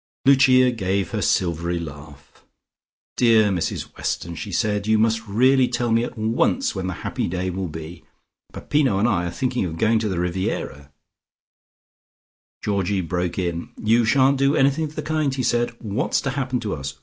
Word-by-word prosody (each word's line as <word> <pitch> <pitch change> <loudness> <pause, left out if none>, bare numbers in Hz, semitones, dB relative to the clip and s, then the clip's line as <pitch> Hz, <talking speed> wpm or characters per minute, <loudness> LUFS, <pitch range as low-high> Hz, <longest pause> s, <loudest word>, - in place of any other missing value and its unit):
Lucia 130 -2 +5
gave 95 -4 -2
her - - -2
silvery 85 0 0
laugh. 75 -3 -11 0.7
"Dear 110 -4 +4
Mrs 90 -3 -3
Weston," 85 - -3
she 90 +5 -6
said, 105 +2 -1
"you 110 0 +4
must 110 +1 +1
really 130 +5 +3
tell 120 -1 -1
me 115 +1 +3
at 120 - -6
once 115 - +1
when 95 -2 -4
the 95 - -3
happy - - -2
day 90 +1 -2
will 95 +1 -3
be. 80 +1 -9 0.5
Peppino 140 -9 0
and 105 +4 +2
I 90 -6 +1
are - - -2
thinking 125 +5 -2
of 80 -3 -4
going 110 +5 +2
to 110 -1 -2
the 95 - -2
Riviera 90 +5 -3 0.9
" - - -52
Georgie 100 -2 0
broke 90 0 -3
in. 85 -2 -3
"You 115 +2 +2
shan't 135 +3 +3
do 140 +2 +3
anything 140 +3 +2
of 155 0 -9
the - - -4
kind," 155 -3 -1
he 130 - -2
said. 120 0 +1
"What's 105 -2 -1
to 135 - -2
happen 130 -2 -2
to 105 - -3
us? 70 -2 -6
105 Hz, 180 wpm, -22 LUFS, 90-125 Hz, 0.9 s, Lucia